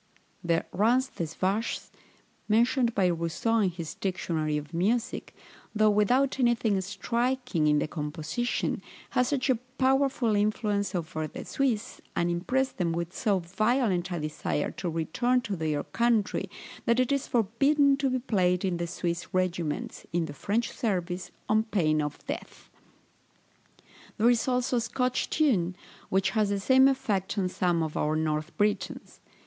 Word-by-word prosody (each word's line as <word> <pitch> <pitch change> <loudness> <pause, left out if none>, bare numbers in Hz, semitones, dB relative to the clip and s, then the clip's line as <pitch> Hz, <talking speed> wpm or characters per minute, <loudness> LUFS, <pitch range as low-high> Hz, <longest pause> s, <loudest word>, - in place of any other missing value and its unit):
THE 170 -1 +1
RANZ 245 +7 +2
DES 165 -2 -3
VACHES, 200 +5 -1 0.6
mentioned 235 +2 +3
by 195 - +3
Rousseau 170 +7 0
in 200 -3 +3
his 165 -3 -6
Dictionary 160 -5 -1
of 150 +2 -7
Music, 225 +8 -1 0.4
though 215 0 +5
without 250 +7 +2
anything 230 -5 +2
striking 230 -2 -1
in 150 0 +4
the 150 - 0
composition, 155 +10 -2 0.3
has 250 - +2
such 270 -2 0
a 250 - +2 0.2
powerful 265 -4 +2
influence 205 -1 0
over 155 -2 -3
the - - -8
Swiss, 245 -6 -1
and 175 0 +1
impresses 260 +10 0
them 170 -3 -1
with 170 +1 -3
so 210 -5 +2
violent 195 +1 +1
a 175 - -2
desire 150 -1 -2
to 180 - -4
return 170 +11 +1
to 205 -4 -3
their 160 -3 -1
own 145 - -2
country, 235 -3 +1 0.4
that 235 +1 +3
it 255 +1 +2
is 280 -1 0
forbidden 275 +6 +3
to 275 -1 +1
be 255 - +1
played 185 -7 +1
in 180 -2 0
the 170 0 -2
Swiss 170 0 -3
regiments, 175 -4 -2
in 170 0 0
the 145 - -7
French 210 - -1
service, 180 -5 -2 0.2
on 215 0 +4
pain 155 -8 +1
of 150 -1 -5
death. - - -7 1.5
There 230 +3 +5
is 240 +1 +1
also 250 0 +1
a - - +1
Scotch 250 +2 -1
tune, 195 - +2 0.3
which 190 +1 +2
has 215 -3 +1
the 200 0 0
same 260 +6 +6
effect 220 -8 0
on 190 -2 +1
some 175 -2 +1
of 155 -1 -4
our 150 +1 +1
North 155 +1 -2
Britons. 210 0 -1
200 Hz, 155 wpm, -28 LUFS, 170-240 Hz, 1.5 s, same